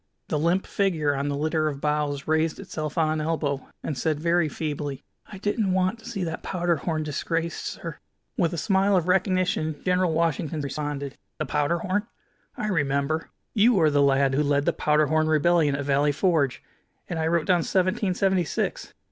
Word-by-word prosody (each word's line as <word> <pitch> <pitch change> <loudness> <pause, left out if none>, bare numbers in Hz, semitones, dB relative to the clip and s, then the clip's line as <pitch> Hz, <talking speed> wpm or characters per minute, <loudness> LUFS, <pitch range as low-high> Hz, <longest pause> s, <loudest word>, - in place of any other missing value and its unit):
The 150 - 0
limp 170 +5 +1
figure 165 -8 +1
on 140 +1 -1
the 140 - -2
litter 155 +1 0
of 140 -2 -3
boughs 150 -1 -1
raised 160 0 +1
itself 155 -5 -5
on 160 -1 +3
an 155 0 -1
elbow, 150 -4 -1 0.2
and 155 - -3
said 150 +3 -1
very 170 0 +2
feebly: 145 -2 -4 0.2
"I 205 - -9
didn't 205 0 0
want 185 +5 +1
to 225 - -16
see 200 -5 -3
that 165 -1 -4
powder 175 -2 0
horn 155 +1 -2
disgraced, 165 +3 -2
sir." - - -6 0.4
With 175 - +1
a 170 - -4
smile 195 +2 +3
of 175 -1 0
recognition 185 -3 +1
General 180 -1 +2
Washington 160 -1 0
responded: 140 -1 -4 0.2
"The 155 - -2
powder 150 +4 +1
horn? 195 +5 -1 0.5
I - - -2
remember. 145 -2 0 0.2
You 220 -1 +4
are 155 -2 +4
the 145 0 +3
lad 135 -1 +3
who 140 - +2
led 145 -1 +1
the - - +2
powder 150 0 +2
horn 155 +1 +2
rebellion 155 -1 +3
at 140 0 -3
Valley 145 +1 +3
Forge. 150 -5 +1 0.4
And 170 - -3
I 160 - +1
wrote 165 -1 +1
down 180 -2 +3
'Seventeen 185 +1 +1
seventy 190 -2 +2
six.' 150 - -3
160 Hz, 190 wpm, -25 LUFS, 145-180 Hz, 0.5 s, You